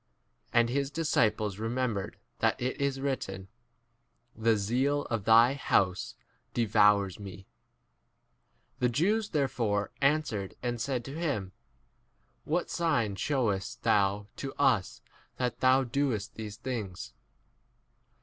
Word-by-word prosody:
[And] 120 -1 +4
his 140 +2 0
disciples 110 -10 0
remembered 115 -3 -2 0.2
that - - +1
it 130 +3 -2
is 140 -1 0
written, 95 -9 -3 0.9
The 115 0 +2
zeal 130 +8 +1
of 110 -4 -1
thy 115 +3 +6
house 95 -9 0 0.4
18 115 -2 +1
devoursi 105 -3 +4
me. 95 -2 -9 1.3
The 125 -2 +2
Jews 205 - +1
therefore 120 -9 0
answered 135 -9 0
and 120 -1 -2
said 125 -3 -2
to 140 +4 -6
him, 120 - -2 0.9
What 170 +3 -1
sign 120 - +1
shewest 105 -4 -1
thou 100 0 +2
to - - -5
us - - +1 0.3
that 125 -2 -2
thou 130 +1 +5
19 120 - -9 0.2
doest 110 -1 -3
these 105 -2 -7
things 110 -7 -5
115 Hz, 120 wpm, -30 LUFS, 105-135 Hz, 1.3 s, thy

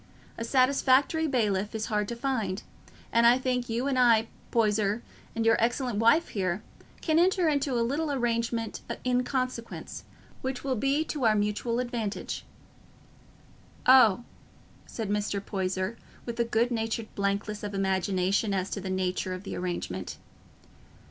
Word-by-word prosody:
A - - -5
satisfactory 270 +5 +3
bailiff 210 -6 0
is 220 0 -2
hard 210 -2 -1
to 235 - -4
find; 225 -7 -2 0.5
and 235 0 +6
I 240 +1 +6
think 250 -2 -1
you 235 +3 -1
and 270 -2 +1
I, 230 -2 +4 0.2
Poyser, 215 -1 +1 0.3
and 225 0 0
your 225 0 +5
excellent 240 -1 0
wife 270 +10 +4
here, 190 -1 -2 0.4
can 315 -1 +2
enter 365 0 +3
into 285 -3 +1
a 235 -1 +2
little 290 +5 -1
arrangement 235 -3 -1 0.2
in 250 0 +2
consequence, 255 -3 -4 0.4
which 260 -1 -3
will 270 -1 0
be 275 +6 +1
to 290 -6 -2
our 215 -1 +5
mutual 210 +3 0
advantage." 240 -4 -3 1.4
"Oh," 240 -4 +6 0.6
said 220 -3 -4
Mr. 205 -1 0
Poyser, 190 +1 -2 0.3
with 235 -1 -5
a 235 - +3
good 235 +2 +1
natured 225 -1 -2
blankness 200 +1 -2
of 205 -1 -5
imagination 190 +1 +1
as 190 0 -2
to 200 - -3
the 190 - -5
nature 185 0 -1
of 185 - -9
the - - -5
arrangement. 95 - -4
230 Hz, 150 wpm, -28 LUFS, 205-255 Hz, 1.4 s, and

